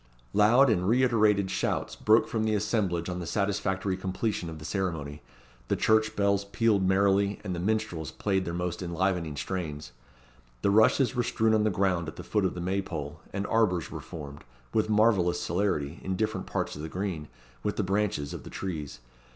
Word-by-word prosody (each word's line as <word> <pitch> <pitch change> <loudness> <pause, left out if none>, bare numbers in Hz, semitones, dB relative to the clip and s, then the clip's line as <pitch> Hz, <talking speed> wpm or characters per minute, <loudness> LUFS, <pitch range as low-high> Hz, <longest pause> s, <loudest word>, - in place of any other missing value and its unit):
Loud 115 +6 +5
and 90 -2 +1
reiterated 110 -5 +3
shouts - - -1
broke 110 +2 +4
from 110 -2 -1
the 110 -1 +1
assemblage 100 -5 0
on 90 -1 -3
the 85 - -5
satisfactory 95 -1 0
completion 95 -1 -2
of 80 - -7
the 75 - -10
ceremony, 80 -7 -3 0.5
the - - +1
church 110 0 +2
bells 100 -1 +2
pealed 105 0 +1
merrily, 100 +1 +2
and 95 -3 -3
the 85 - -3
minstrels 95 -6 -1
played 95 +6 -1
their 85 - -4
most 90 0 -3
enlivening 85 -3 -1
strains. 75 -4 -4 0.7
The 100 - +3
rushes 110 +5 +4
were 125 - +1
strewn 110 -2 +1
on 110 -1 +3
the - - +3
ground 90 -3 0
at 80 - -7
the - - -8
foot 105 -3 0
of 90 - -1
the 90 - -4
May 95 +3 0
pole, 75 -6 -6
and 100 0 -3
arbours 100 -8 +1
were - - -5
formed, 70 -3 -9 0.3
with 110 0 +1
marvellous 105 -5 +3
celerity, 85 -5 -1
in 95 - -2
different 110 +3 -2
parts - - -2
of 75 - -7
the 80 - -5
green, 90 -4 -3 0.3
with 105 - -2
the 105 - 0
branches 95 -6 -1
of - - -6
the - - -10
trees. 75 -9 -5
95 Hz, 190 wpm, -28 LUFS, 85-105 Hz, 0.7 s, Loud